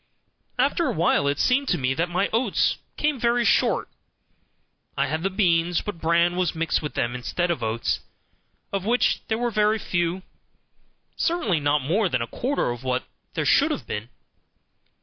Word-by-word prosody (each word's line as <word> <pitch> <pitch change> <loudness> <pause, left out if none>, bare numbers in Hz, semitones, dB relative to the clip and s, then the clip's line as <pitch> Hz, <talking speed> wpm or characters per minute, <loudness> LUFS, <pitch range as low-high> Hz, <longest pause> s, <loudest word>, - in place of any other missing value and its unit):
After 285 +6 +2
awhile 170 - +2
it 140 0 +1
seemed 270 - +2
to - - +1
me 130 -1 0
that 165 +5 -1
my 180 +3 +1
oats 230 -3 +1 0.2
came 295 -3 0
very 235 0 +2
short; - - +2 1.1
I - - +2
had 155 +1 -2
the 195 - 0
beans, 175 -3 +2
but 205 -5 -6
bran 170 +2 +3
was 180 -3 0
mixed 165 0 0
with 150 - -5
them 120 +1 0
instead 175 +8 -1
of 160 - -2
oats, 115 +1 -1 0.7
of 195 -2 -1
which 240 +4 +2
there 220 - 0
were 240 0 -1
very 215 0 +2
few; 175 -2 -1 0.9
certainly 240 - 0
not 145 -1 +1
more 185 +8 +1
than 130 - 0
a - - -3
quarter 250 - -1
of 120 +1 -7
what 130 0 -1 0.3
there - - -1
should - - +4
have - - -3
been. 105 +3 -5
175 Hz, 170 wpm, -24 LUFS, 150-225 Hz, 1.1 s, should